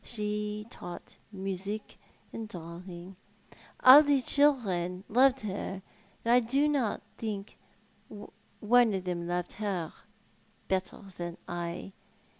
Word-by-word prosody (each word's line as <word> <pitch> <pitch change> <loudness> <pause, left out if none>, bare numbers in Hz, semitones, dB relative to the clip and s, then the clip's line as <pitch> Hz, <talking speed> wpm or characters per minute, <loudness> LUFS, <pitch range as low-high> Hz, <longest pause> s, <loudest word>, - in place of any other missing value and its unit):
She 210 -1 -3
taught 175 0 -9
music 195 +1 -5 0.3
and 225 -1 -6
drawing. 175 0 -9 0.7
All 260 +3 +11
the 285 -2 +3
children 195 -12 +2
loved 260 +3 +4
her, 195 -2 -4 0.4
but 230 - +1
I 245 - +7
don't 270 -1 +1 0.2
think 210 -3 -4 0.5
one 220 +2 +1
of 190 - -3
them 175 -2 -3
loved 175 0 -2
her 190 -6 -3 0.7
better 190 +2 -2
than 175 0 -5
I. 175 +2 -5
205 Hz, 105 wpm, -30 LUFS, 180-230 Hz, 0.7 s, All